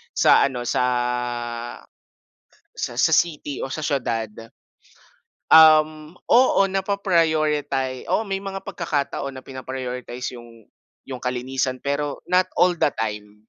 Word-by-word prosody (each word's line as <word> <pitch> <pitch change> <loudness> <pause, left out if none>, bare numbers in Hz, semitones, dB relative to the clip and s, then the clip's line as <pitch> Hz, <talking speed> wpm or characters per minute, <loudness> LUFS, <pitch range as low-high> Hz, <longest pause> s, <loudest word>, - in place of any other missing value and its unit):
sa - - +5
ano 125 -3 -5
sa - - +1 1.9
sa - - -4
sa - - +3
city 150 -4 0
o 135 - -6
sa - - -4
siyudad, 115 -7 -1 1.2
um, 155 0 +6 0.2
oo 250 -3 +5
napaprioriti 160 -9 0
oo, 225 - +1
may 195 0 -3
mga 195 -1 -5
pagkakataon 140 -4 -3
na 130 - -12
pina-prioritize 125 -1 -6
yung 115 -2 -14 0.4
yung 130 -2 -7
kalinisan 130 +1 -2
pero 140 0 -2
not 185 +1 +3
all 180 0 +5
the - - +2
time. 105 -1 -4
140 Hz, 115 wpm, -22 LUFS, 125-165 Hz, 1.9 s, um